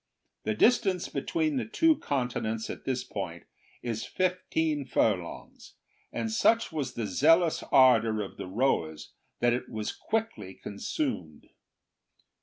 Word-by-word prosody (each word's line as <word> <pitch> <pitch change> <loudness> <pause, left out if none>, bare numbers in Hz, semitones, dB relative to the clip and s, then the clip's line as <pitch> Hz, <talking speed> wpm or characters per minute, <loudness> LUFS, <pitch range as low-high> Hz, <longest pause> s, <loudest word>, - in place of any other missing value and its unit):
The 110 - 0
distance 195 - +3
between 315 -4 -1
the 255 - -1
two 320 +8 +3
continents 120 -5 -2
at - - -9
this 130 -1 -1
point 85 -4 -6 0.4
is 115 -2 -3
fifteen 170 -5 -1
furlongs, 100 -9 -2 0.4
and 115 -1 -3
such 230 - +3
was 145 -5 -3
the 115 - -2
zealous 160 - +3
ardour 115 -5 +5
of 95 - -10
the - - -6
rowers 90 - -1 0.3
that 120 0 +4
it 125 - -3
was 110 -1 -3
quickly 210 - -3
consumed. 100 - -4
125 Hz, 125 wpm, -29 LUFS, -, 0.4 s, ardour